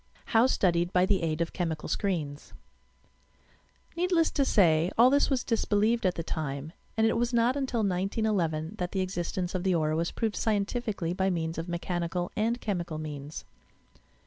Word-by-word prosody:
HOW 230 Hz, +3 st, +6 dB
STUDIED 175 Hz, -7 st, +1 dB
BY 180 Hz, 0 st, +4 dB
THE 195 Hz, 0 st, +1 dB
Am 165 Hz, -2 st, 0 dB
OP 170 Hz, -, -1 dB
CHEMICAI, 165 Hz, -4 st, -3 dB
SCREENS 155 Hz, -8 st, -3 dB, 1.4 s
Needless 345 Hz, -2 st, +2 dB
to 280 Hz, -, +1 dB
say 170 Hz, -9 st, +4 dB
all 245 Hz, +3 st, +7 dB
this 285 Hz, +1 st, +3 dB
was 265 Hz, -3 st, +1 dB
disbelieved 220 Hz, -1 st, +1 dB
at 180 Hz, -, 0 dB
the 165 Hz, -, -3 dB
time, 150 Hz, -1 st, -4 dB, 0.2 s
and 220 Hz, -, +4 dB
it 225 Hz, -, +2 dB
was 240 Hz, +1 st, 0 dB
not 235 Hz, +2 st, +3 dB
until 265 Hz, -5 st, -1 dB
1911 190 Hz, -3 st, -1 dB
that 180 Hz, -1 st, -3 dB
the 190 Hz, -, 0 dB
existence 180 Hz, -1 st, -3 dB
of 185 Hz, -, -1 dB
the 190 Hz, -2 st, +2 dB
aura 155 Hz, -1 st, +1 dB
was 170 Hz, +1 st, 0 dB
proved 220 Hz, -3 st, -2 dB
scientifically 205 Hz, -4 st, -1 dB
by 190 Hz, +1 st, +1 dB
means 165 Hz, -2 st, -2 dB
of 165 Hz, +2 st, -5 dB
mechanical 175 Hz, 0 st, -2 dB
and 230 Hz, +3 st, 0 dB
chemical 175 Hz, -8 st, -3 dB
means. 150 Hz, -1 st, -6 dB
185 Hz, 170 wpm, -28 LUFS, 165-225 Hz, 1.4 s, all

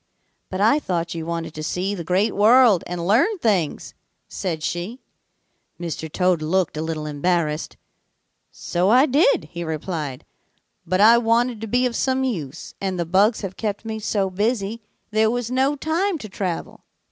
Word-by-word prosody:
"'But 185 Hz, +1 st, -3 dB
I 225 Hz, +8 st, +4 dB
thought 170 Hz, -, -2 dB
you 165 Hz, -1 st, -5 dB
wanted 165 Hz, -1 st, -4 dB
to 155 Hz, -, -7 dB
see 180 Hz, +5 st, -2 dB
the 180 Hz, -4 st, -5 dB
Great 185 Hz, +6 st, +1 dB
World 220 Hz, -2 st, +5 dB
and 175 Hz, -1 st, -4 dB
learn 270 Hz, -, +3 dB
things,' 200 Hz, -, 0 dB, 0.3 s
said 165 Hz, -5 st, -4 dB
she. 180 Hz, +11 st, -3 dB, 0.8 s
"Mr. 160 Hz, -2 st, -5 dB
Toad 180 Hz, -2 st, +1 dB
looked 170 Hz, +2 st, 0 dB
a 155 Hz, -, -3 dB
little 160 Hz, -1 st, -3 dB
embarrassed. 150 Hz, +1 st, -1 dB, 0.7 s
'So 180 Hz, +3 st, -1 dB
I 255 Hz, +5 st, +6 dB
did,' 330 Hz, -, +2 dB
he 170 Hz, 0 st, -5 dB
replied, 155 Hz, -4 st, -4 dB, 0.6 s
'but 185 Hz, +3 st, +1 dB
I 230 Hz, +3 st, +7 dB
wanted 235 Hz, 0 st, +1 dB
to 225 Hz, -, -4 dB
be 245 Hz, +4 st, +2 dB
of 245 Hz, -2 st, -1 dB
some 265 Hz, +1 st, +1 dB
use, 165 Hz, -, -4 dB
and 190 Hz, -2 st, -2 dB
the 170 Hz, -, 0 dB
bugs 200 Hz, +6 st, +3 dB
have 190 Hz, -2 st, -6 dB
kept 210 Hz, 0 st, -3 dB
me 220 Hz, -1 st, -4 dB
so 200 Hz, -3 st, -1 dB
busy 215 Hz, +2 st, -1 dB, 0.3 s
there 220 Hz, +1 st, +3 dB
was 245 Hz, 0 st, -2 dB
no 265 Hz, +3 st, +2 dB
time 330 Hz, +6 st, -1 dB
to 225 Hz, -, -8 dB
travel. 190 Hz, -3 st, -5 dB
195 Hz, 170 wpm, -22 LUFS, 170-235 Hz, 0.8 s, I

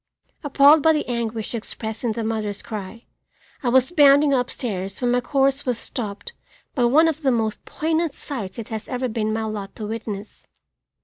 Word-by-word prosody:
Appalled 290 Hz, +1 st, +6 dB
by 320 Hz, +2 st, +5 dB
the 305 Hz, -, -1 dB
anguish 230 Hz, -2 st, -3 dB
expressed 220 Hz, 0 st, -5 dB
in 230 Hz, -2 st, 0 dB
the 230 Hz, +1 st, -3 dB
mother's 215 Hz, -2 st, -2 dB
cry, 215 Hz, +1 st, -7 dB, 0.6 s
I 250 Hz, -, 0 dB
was 260 Hz, +4 st, +4 dB
bounding 285 Hz, -3 st, +6 dB
up 250 Hz, -2 st, +1 dB
stairs 195 Hz, -6 st, -4 dB
when 245 Hz, -1 st, +1 dB
my 245 Hz, 0 st, +2 dB
course 275 Hz, +1 st, +1 dB
was 250 Hz, -3 st, -1 dB
stopped 225 Hz, -, -5 dB, 0.4 s
by 245 Hz, -4 st, +2 dB
one 300 Hz, +7 st, +5 dB
of 320 Hz, -1 st, -1 dB
the 270 Hz, -3 st, +2 dB
most 220 Hz, -3 st, -1 dB
poignant 320 Hz, -1 st, -1 dB
sights 235 Hz, -10 st, -6 dB
it 230 Hz, -, -7 dB
has 220 Hz, -1 st, -5 dB
ever 255 Hz, 0 st, -1 dB
been 220 Hz, -2 st, -1 dB
my 220 Hz, 0 st, -1 dB
lot 210 Hz, -3 st, -5 dB
to 215 Hz, -, -5 dB
witness. 215 Hz, -1 st, -6 dB
240 Hz, 185 wpm, -23 LUFS, 220-275 Hz, 0.6 s, Appalled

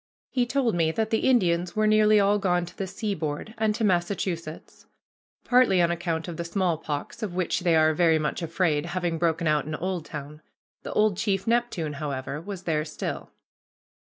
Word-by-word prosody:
He 250 Hz, -2 st, +1 dB
told 255 Hz, -3 st, +1 dB
me 165 Hz, -2 st, +2 dB
that 220 Hz, +2 st, -1 dB
the 225 Hz, +3 st, +2 dB
Indians 175 Hz, -7 st, +2 dB
were 215 Hz, 0 st, +2 dB
nearly 215 Hz, 0 st, +5 dB
all 205 Hz, +1 st, +3 dB
gone 180 Hz, -3 st, +1 dB
to 180 Hz, -, -13 dB
the 195 Hz, -, -4 dB
seaboard 190 Hz, -2 st, -4 dB
and 220 Hz, -1 st, 0 dB
to 225 Hz, -, -2 dB
Massachusetts, 175 Hz, -4 st, -2 dB, 0.6 s
partly 245 Hz, -7 st, +4 dB
on 170 Hz, -1 st, +3 dB
account 165 Hz, -1 st, -2 dB
of 170 Hz, -2 st, -6 dB
the 170 Hz, -, -3 dB
smallpox, 170 Hz, +2 st, -2 dB
of 200 Hz, -5 st, -4 dB
which 180 Hz, -2 st, 0 dB
they 175 Hz, -2 st, +2 dB
are 155 Hz, 0 st, +4 dB
very 165 Hz, 0 st, +3 dB
much 155 Hz, +3 st, -2 dB
afraid, 165 Hz, -2 st, 0 dB
having 175 Hz, -2 st, -2 dB
broken 165 Hz, 0 st, +1 dB
out 150 Hz, -2 st, +2 dB
in 155 Hz, 0 st, -4 dB
Oldtown. 155 Hz, -4 st, -5 dB, 0.4 s
The -, -, -6 dB
old 210 Hz, -3 st, +2 dB
chief 195 Hz, -2 st, 0 dB
Neptune, 230 Hz, -10 st, 0 dB
however, 140 Hz, 0 st, -4 dB
was 190 Hz, 0 st, -7 dB
there 155 Hz, -4 st, 0 dB
still. 155 Hz, -, -5 dB
175 Hz, 180 wpm, -26 LUFS, 160-210 Hz, 0.6 s, nearly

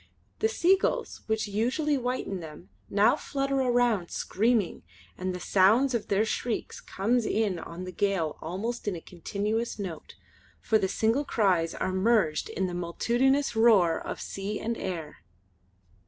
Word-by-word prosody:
The 440 Hz, -, +2 dB
seagulls 380 Hz, -2 st, +1 dB
which 220 Hz, 0 st, 0 dB
usually 250 Hz, +9 st, 0 dB
whiten 250 Hz, -6 st, -2 dB
them, 160 Hz, +1 st, -10 dB, 0.2 s
now 210 Hz, +6 st, +4 dB
flutter 275 Hz, -2 st, -2 dB
around 240 Hz, -7 st, +2 dB
screaming, 220 Hz, -1 st, 0 dB, 0.3 s
and 185 Hz, 0 st, -3 dB
the 180 Hz, -, -5 dB
sound 220 Hz, +10 st, +4 dB
of 235 Hz, -, -1 dB
their 205 Hz, +2 st, +2 dB
shrieks 225 Hz, +1 st, -3 dB
comes 230 Hz, +5 st, 0 dB
in 210 Hz, -5 st, 0 dB
on 170 Hz, +2 st, -7 dB
the 185 Hz, -, -6 dB
gale 180 Hz, -4 st, -1 dB
almost 210 Hz, +9 st, -4 dB
in 200 Hz, -, 0 dB
a -, -, -5 dB
continuous 210 Hz, +7 st, -3 dB
note, 185 Hz, -6 st, -7 dB, 0.4 s
for 220 Hz, -, +2 dB
the 190 Hz, -, +1 dB
single 225 Hz, +8 st, +1 dB
cries 185 Hz, -, +1 dB
are 185 Hz, -, -2 dB
merged 190 Hz, -6 st, +2 dB
in 190 Hz, -, -1 dB
the 180 Hz, -, -3 dB
multitudinous 240 Hz, +10 st, +1 dB
roar 210 Hz, -8 st, +5 dB
of -, -, -5 dB
sea 200 Hz, +2 st, -4 dB
and 230 Hz, +1 st, -2 dB
air. 165 Hz, -8 st, -5 dB
210 Hz, 150 wpm, -28 LUFS, 185-240 Hz, 0.4 s, roar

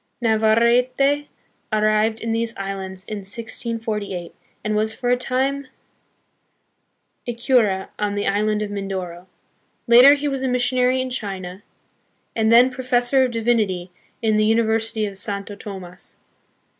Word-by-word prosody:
Navarrete 240 Hz, +5 st, +2 dB, 0.4 s
arrived 215 Hz, +1 st, +1 dB
in 230 Hz, -, -2 dB
these 230 Hz, 0 st, -2 dB
islands 190 Hz, -1 st, -5 dB
in 215 Hz, +1 st, -6 dB
1648, 215 Hz, -3 st, -4 dB, 0.3 s
and 215 Hz, 0 st, -1 dB
was 220 Hz, +1 st, 0 dB
for 245 Hz, -1 st, -1 dB
a -, -, +5 dB
time 265 Hz, +2 st, -1 dB, 1.6 s
a 240 Hz, -, -3 dB
cura 230 Hz, -6 st, +2 dB
on 205 Hz, -1 st, -1 dB
the 205 Hz, -, -2 dB
island 210 Hz, +1 st, +1 dB
of 205 Hz, -, -5 dB
Mindoro. 190 Hz, -3 st, -5 dB, 0.6 s
Later 250 Hz, +4 st, +8 dB
he 290 Hz, 0 st, -3 dB
was 270 Hz, -2 st, -2 dB
a 265 Hz, -, 0 dB
missionary 250 Hz, +1 st, +2 dB
in 255 Hz, 0 st, -4 dB
China, 195 Hz, -5 st, -5 dB, 0.7 s
and 220 Hz, 0 st, +2 dB
then 245 Hz, +3 st, +6 dB
Professor 255 Hz, +1 st, +2 dB
of -, -, -2 dB
Divinity 220 Hz, -6 st, 0 dB, 0.3 s
in 215 Hz, -1 st, +2 dB
the 215 Hz, -, +3 dB
University 225 Hz, 0 st, +1 dB
of 195 Hz, -2 st, -5 dB
Santo 200 Hz, +1 st, -4 dB
Tomas. 190 Hz, -3 st, -10 dB
220 Hz, 130 wpm, -21 LUFS, 200-245 Hz, 1.6 s, Later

